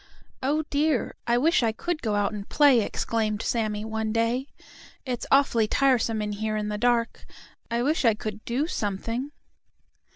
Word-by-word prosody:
"Oh, 295 +4 +1
dear, 290 -3 +1
I 235 0 +3
wish 315 +6 +3
I 230 -2 +2
could 325 +8 -3
go 215 -3 -1
out 205 +1 0
and 205 -1 -7
play!" 285 -5 +5
exclaimed 215 0 -1
Sammie 215 -2 -1
one 220 0 -2
day. 230 +4 0 0.6
"It's 250 -3 -3
awfully 255 -5 +3
tiresome 235 -4 +2
in 210 - -3
here 215 +1 -2
in 210 0 -2
the 210 - -2
dark. 240 0 +1 0.5
I 235 +1 0
wish 305 +4 +1
I 225 -3 +4
could 215 0 -6
do 255 +6 -1
something." 230 - -3
230 Hz, 165 wpm, -26 LUFS, 215-265 Hz, 0.6 s, play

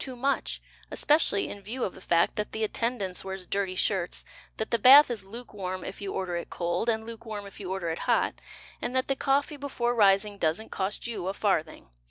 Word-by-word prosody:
too 260 -2 -6
much, 275 +3 -1 0.3
Especially 295 -9 +3
in 205 - -8
view 235 +6 -4
of 185 - -2
the - - -13
fact 170 0 +2
That 210 - -3
the 220 - -1
attendance 215 -4 -1
wears 190 -1 -6
dirty 190 0 -1
shirts, 185 -2 0 0.3
That 220 - -3
the 235 - +2
bath 270 +4 +9
Is 220 -5 -3
lukewarm 195 -4 -6
if 195 - -7
you 200 -1 -3
order 180 -2 -2
it 170 - -6
cold 175 +6 -1
And 220 -1 0
lukewarm 220 -2 -7
if 200 - -11
you 190 -3 -6
order 190 -3 -2
it 165 - -4
hot; - - +2 0.4
And 245 - -3
that 260 +1 +1
the 275 - +2
coffee 280 +2 +1
before 255 -4 -1
rising 200 -2 +3
Doesn't 165 +7 0
cost 195 +1 -2
you 225 -6 -3
a 195 - -2
farthing. 195 -7 -1
205 Hz, 210 wpm, -28 LUFS, 190-240 Hz, 0.4 s, bath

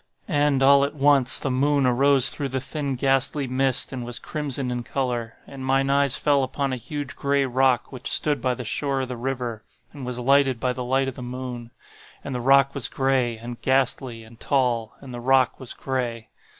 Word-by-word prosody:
"And, 145 -2 +2
all 140 +1 +6
at 140 - -2
once, 140 -2 +4
the 135 - -2
moon 140 +2 +2
arose 135 +1 +3
through 140 -2 -3
the 130 +1 -2
thin 140 0 -3
ghastly 135 +2 +1
mist, 130 0 0
and 125 -2 -4
was 120 0 -5
crimson 140 -4 -3
in 125 0 -2
color. 120 -2 -3
And 135 -1 -9
mine 135 +1 +1
eyes 140 -2 +3
fell 145 -2 +2
upon 135 +1 -2
a - - 0
huge 140 +3 -6
gray 140 0 +1
rock 130 -1 +1
which 130 -1 -6
stood 150 -1 +2
by 125 -1 0
the 125 - -7
shore 135 +4 -1
of 130 - -4
the 125 - -4
river, 120 -3 -4 0.3
and 140 -3 -9
was 125 -1 -4
lighted 135 0 +3
by 125 0 0
the 125 0 -5
light 135 +2 +1
of 135 - -3
the 125 - -9
moon. 125 -1 -6 0.5
And 140 - -5
the 125 - -3
rock 140 +2 +4
was 135 -6 -3
gray, 130 -3 0
and 120 +1 -8
ghastly, 130 -3 0
and 110 +1 -16
tall,—and 125 -1 -1
the 120 - -6
rock 130 0 +2
was 130 - -7
gray. 120 -4 -3
130 Hz, 200 wpm, -24 LUFS, 125-140 Hz, 0.5 s, all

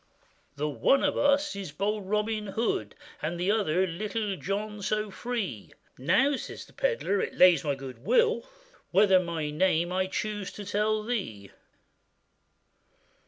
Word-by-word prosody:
'The 150 +1 -1
one 145 - +2
of 290 - +1
us 285 -2 +2
is 195 -6 -6
bold 200 +4 -2
Robin 210 0 0
Hood, 195 - -1 0.3
And 170 +3 -3
the 180 +3 +2
other 190 -4 +2
Little 205 +3 -3
John, 205 +3 -4
so 215 +1 -1
free.' 200 - -4 0.2
'Now,' 235 - +2
says - - -7
the - - -20
pedlar, 470 - 0
'it - - -3
lays 180 -5 +6
to - - -8
my 140 - +1
good 135 -3 -9
will, 460 - +3 0.5
Whether 190 0 +5
my 165 -4 -3
name 170 +1 +1
I 185 0 +1
chuse 205 0 -3
to 205 - -8
tell 210 +2 0
to - - -11
thee. 110 - -3
200 Hz, 155 wpm, -28 LUFS, 170-215 Hz, 0.5 s, lays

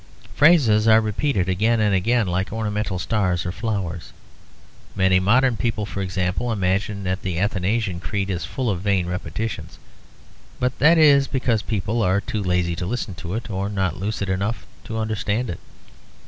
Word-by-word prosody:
Phrases 125 -10 +5
are 110 0 +7
repeated 110 -2 0
again 110 +5 +2
and 105 -2 +2
again 115 +5 +2
like 90 +1 -2
ornamental 105 -3 -2
stars 90 -2 0
or 90 - -2
flowers. 95 -6 -4 0.8
Many 95 -1 +3
modern 120 +5 +3
people, 105 +1 -1
for 100 -1 -5
example, 95 +5 -1
imagine 100 0 -1
that 95 +1 -2
the 90 -3 -3
Athanasian 100 0 0
Creed 95 +3 -2
is 90 -2 -3
full 130 -2 -3
of 90 -3 -3
vain 100 -3 +1
repetitions; 90 -1 -5 0.8
but 125 0 -1
that 165 +5 +6
is 140 -3 +6
because 125 -4 0
people 110 +1 -2
are 95 -1 +2
too 105 +1 -4
lazy 90 -2 0
to 90 - -3
listen 115 -2 -3
to 85 +3 -6
it, 115 -1 -5
or 100 +1 -2
not 95 -3 -1
lucid 100 0 -3
enough 100 +5 -2 0.2
to 110 - -5
understand 110 +1 -1
it. 85 - -7
100 Hz, 165 wpm, -22 LUFS, 95-115 Hz, 0.8 s, are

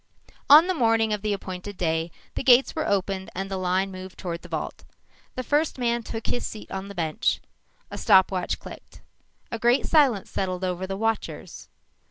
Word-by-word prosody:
On 300 +4 +10
the 370 - 0
morning 225 -6 +2
of 210 - -2
the 210 0 -1
appointed 190 0 -5
day, 165 -1 0 0.2
the - - -3
gates 255 0 +5
were 315 - -1
opened 195 -1 -1
and 195 +1 -4
the 190 - -1
line 185 +1 0
moved 185 0 -9
toward 170 -2 -5
the - - -13
vault. - - -4 0.5
The 255 - -3
first 295 +4 +1
man 240 -1 0
took 225 0 -6
his 245 - -1
seat 215 - -7
on 195 0 -4
the 200 - -9
bench. 160 -3 0 0.5
A - - -5
stopwatch 190 -1 +3
clicked. - - -12 0.5
A 230 - -3
great 240 +3 +3
silence 270 - +3
settled 185 -1 -2
over 185 0 -2
the 195 0 -4
watchers. 225 +1 -3
200 Hz, 185 wpm, -25 LUFS, 185-235 Hz, 0.5 s, On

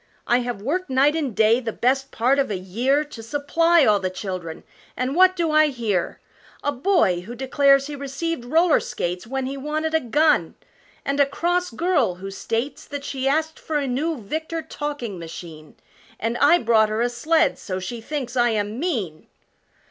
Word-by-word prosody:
I 240 - +3
have 240 -5 -4
worked 350 +7 -2
night 275 +3 +3
and 280 -9 -2
day 220 +2 +4
the 230 -3 -4
best 270 +4 0
part 255 +5 +2
of 275 - +1
a 200 - -2
year 240 +11 0
To 295 -6 -10
supply 295 +6 +2
all 210 -3 +4
the 185 -1 -2
children, 185 -3 -6 0.3
and 255 +3 -1
what 370 +1 +5
do 335 -3 0
I 310 0 +5
hear 225 -10 -2 0.4
A 290 - +1
boy 280 - +2
who 230 +7 -9
declares 275 +2 +3
he 295 0 -6
received 280 +2 -4
roller 320 +6 +3
skates 180 +4 -4
When 265 +1 -2
he 275 +1 -4
wanted 310 +3 -2
a 320 - +4
gun 300 +4 +2 0.5
and 280 +1 -1
a 285 - +5
cross 350 +5 0
girl 285 - +1
who 195 +2 -8
states 230 +7 -3
That 285 -1 -6
she 270 -2 -3
asked 315 +3 0
for 315 - -2
a 285 - -1
new 290 +5 -1
Victor 315 +9 -4
talking 290 - -5
machine 160 -2 -10 0.4
And 230 +2 -1
I 305 +5 +6
brought 220 -5 +3
her 215 +2 -1
a - - +2
sled, 315 +7 +1
so 185 -2 -4
she 225 +6 -6
thinks 260 -1 -5
I 240 -1 +3
am 215 +1 -2
'mean!'" 220 - -3
270 Hz, 185 wpm, -23 LUFS, 225-305 Hz, 0.5 s, I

